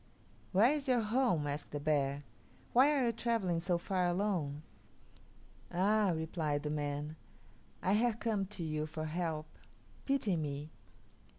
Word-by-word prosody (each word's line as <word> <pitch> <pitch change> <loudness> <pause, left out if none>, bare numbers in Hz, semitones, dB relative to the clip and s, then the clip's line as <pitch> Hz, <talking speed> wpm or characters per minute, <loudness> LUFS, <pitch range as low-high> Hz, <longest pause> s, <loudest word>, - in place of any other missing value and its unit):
"Where 215 +7 +5
is 295 -2 -3
your 250 -2 +3
home?" 220 - +2
asked 145 0 -3
the 145 - -4
bear. 145 -1 0 0.5
"Why 265 +5 +6
are 275 -4 +2
you 235 - +3
travelling 225 -7 0
so 175 +1 +1
far 180 +1 0
alone?" 175 -6 -1 1.1
"Ah," 200 +2 +3
replied 160 -2 -1
the 150 - -2
man, 150 +1 -3 0.7
"I 190 - +3
have 230 +1 +2
come 210 -4 0
to 195 -3 -5
you 155 -1 -2
for 155 0 -5
help. 160 -1 -2 0.6
Pity 270 -9 +2
me. 150 -1 -3
175 Hz, 140 wpm, -34 LUFS, 150-215 Hz, 1.1 s, Why